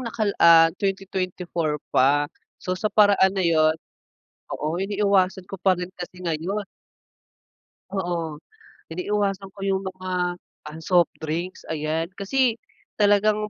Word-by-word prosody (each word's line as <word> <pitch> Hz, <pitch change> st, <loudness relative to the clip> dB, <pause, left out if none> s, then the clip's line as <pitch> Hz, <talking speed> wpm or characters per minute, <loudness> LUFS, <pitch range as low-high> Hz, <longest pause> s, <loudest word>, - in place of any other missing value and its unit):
nakal 225 Hz, -4 st, -1 dB
ah, 165 Hz, -1 st, +7 dB
2024 185 Hz, -5 st, -2 dB, 0.2 s
pa. 145 Hz, +3 st, +4 dB, 0.3 s
So, 185 Hz, -, -4 dB
sa 185 Hz, +4 st, -1 dB
paraan 205 Hz, -3 st, +4 dB
na 190 Hz, -, +1 dB
yun 160 Hz, -1 st, +3 dB, 0.8 s
oo, 155 Hz, +3 st, -2 dB
iniiwasan 195 Hz, -2 st, +1 dB
ko 195 Hz, -, -5 dB
pa 190 Hz, -2 st, +3 dB
rin 180 Hz, +1 st, -5 dB
kasi 180 Hz, 0 st, -8 dB
ngayon. 175 Hz, +6 st, -2 dB, 1.3 s
Oo, 170 Hz, -5 st, -3 dB, 0.5 s
iniiwasan 195 Hz, +1 st, -1 dB
ko 200 Hz, -, -16 dB
yung 190 Hz, 0 st, +1 dB
mga, 185 Hz, -2 st, -3 dB, 0.3 s
ah, 155 Hz, +1 st, -9 dB
soft 175 Hz, -2 st, +4 dB
drinks, 165 Hz, +4 st, -4 dB
ayan. 155 Hz, +1 st, -1 dB
Kasi 245 Hz, +4 st, +1 dB, 0.4 s
talagang 210 Hz, +1 st, +3 dB
185 Hz, 120 wpm, -24 LUFS, 165-200 Hz, 1.3 s, ah